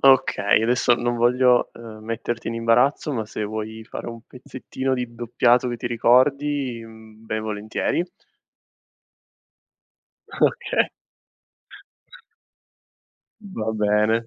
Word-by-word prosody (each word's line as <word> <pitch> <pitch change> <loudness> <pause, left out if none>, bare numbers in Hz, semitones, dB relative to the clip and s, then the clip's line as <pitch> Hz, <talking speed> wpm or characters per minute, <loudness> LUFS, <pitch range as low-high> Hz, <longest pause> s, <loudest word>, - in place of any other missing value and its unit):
Okay, 130 -6 +4
adesso 120 +1 +3
non 120 0 -1
voglio, 125 +1 +3
ehm, 115 -2 -10
metterti 115 +1 -4
in 115 - -3
imbarazzo, 120 +6 +2
ma 115 -5 -2
se 110 - -5
vuoi 110 +1 -5
fare - - -7
un 115 -1 -8
pezzettino 130 +1 -4
di 125 -2 -4
doppiato 120 +1 +2
che 120 - -3
ti 120 - -5
ricordi, 130 +2 +2
mhmm, 110 0 -15
ben 110 0 -2
volentieri. 110 +9 -2 2.3
Okay. - - +1 2.5
Va 115 - -4
bene. 105 +2 +2
115 Hz, 105 wpm, -23 LUFS, 110-125 Hz, 2.5 s, Okay